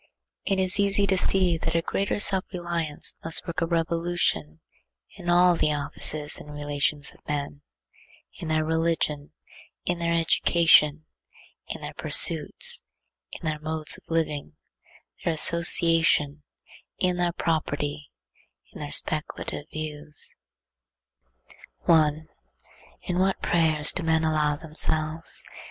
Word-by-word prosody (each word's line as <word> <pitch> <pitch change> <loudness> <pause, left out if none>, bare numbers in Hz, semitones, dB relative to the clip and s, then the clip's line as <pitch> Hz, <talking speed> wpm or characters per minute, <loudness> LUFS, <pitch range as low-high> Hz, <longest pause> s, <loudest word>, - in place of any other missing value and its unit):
It 195 - 0
is 185 +1 +5
easy 200 0 +2
to 195 -1 +1
see 180 -2 +2
that 165 - -3
a 165 - +2
greater 195 +3 -2
self 195 -2 +3
reliance 170 -4 -2
must 165 0 0
work 170 +1 -5
a 165 - 0
revolution 165 - -2 0.6
in 175 - -7
all 175 0 +4
the 155 -2 0
offices 150 +1 -1
and 150 - -12
relations 145 0 -2
of - - -22
men; 145 -1 -4 0.8
in 165 - -7
their 155 0 0
religion; 160 -2 -2 0.5
in 175 -1 -2
their 170 0 -1
education; 160 -2 +3 0.6
in - - -7
their - - -7
pursuits; 485 -1 +4 0.6
their 155 -2 -3
modes 155 0 +2
of - - -31
living; 160 -3 -3 0.7
their 165 - -1
association; 165 -3 +3 0.6
in 180 -2 -1
their 175 -1 -1
property; 150 -3 -3 0.6
in - - -11
their 145 -1 -7
speculative 155 -1 -2
views. 150 -1 -4 1.5
1. 155 -1 +2 0.8
In 180 0 -3
what 190 +1 0
prayers 160 -3 +3
do 185 - -5
men 160 -1 +1
allow 155 -2 0
themselves! 155 +1 0
160 Hz, 120 wpm, -24 LUFS, 150-175 Hz, 1.5 s, is